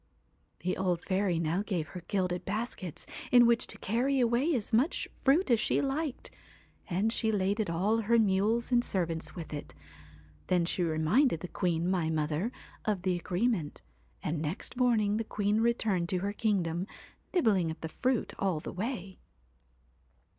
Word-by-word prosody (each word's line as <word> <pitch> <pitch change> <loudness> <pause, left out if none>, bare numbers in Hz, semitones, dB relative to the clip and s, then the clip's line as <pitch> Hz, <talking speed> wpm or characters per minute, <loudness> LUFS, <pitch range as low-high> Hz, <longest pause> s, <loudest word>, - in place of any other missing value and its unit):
'The 185 - -1
old 180 -2 0
fairy 190 -2 +1
now 165 +3 0
gave 180 -7 -2
her 180 -3 -8
gilded 180 -3 -1
baskets 200 -5 -4 0.3
in 245 -1 +8
which 235 0 +3
to - - -8
carry 255 +6 +1
away 245 +6 +2
as 225 -1 -3
much 255 +10 +2
fruit 285 +3 +3
as 235 - +5
she - - +1
liked, 280 0 -2 0.6
and 200 +5 +1
she 220 -2 +1
laded 200 0 0
all 190 +7 +1
her 230 +2 +3
mules 215 +3 +2
and 240 -1 +4
servants 170 -7 -2
with 165 -3 -7
it. 145 - -7 0.7
Then 180 -2 +2
she 180 - -1
reminded 165 - +2
the 180 - -4
queen, 170 -2 0
my 180 -4 +1
mother, 155 +7 -1 0.3
of 205 -4 -1
the 185 -1 +1
agreement; 175 -1 -1 0.4
and 155 0 -1
next 160 +10 -3
morning 225 -5 +2
the 225 - -1
queen 210 0 0
returned 215 -7 +1
to 185 - +1
her 200 +3 -2
kingdom, 185 -5 0 0.4
nibbling 205 - +3
at 160 - -6
the 160 - -3
fruit 250 +7 -1
all 190 -5 +1
the - - -7
way. 195 -2 -4
195 Hz, 160 wpm, -30 LUFS, 175-230 Hz, 0.7 s, in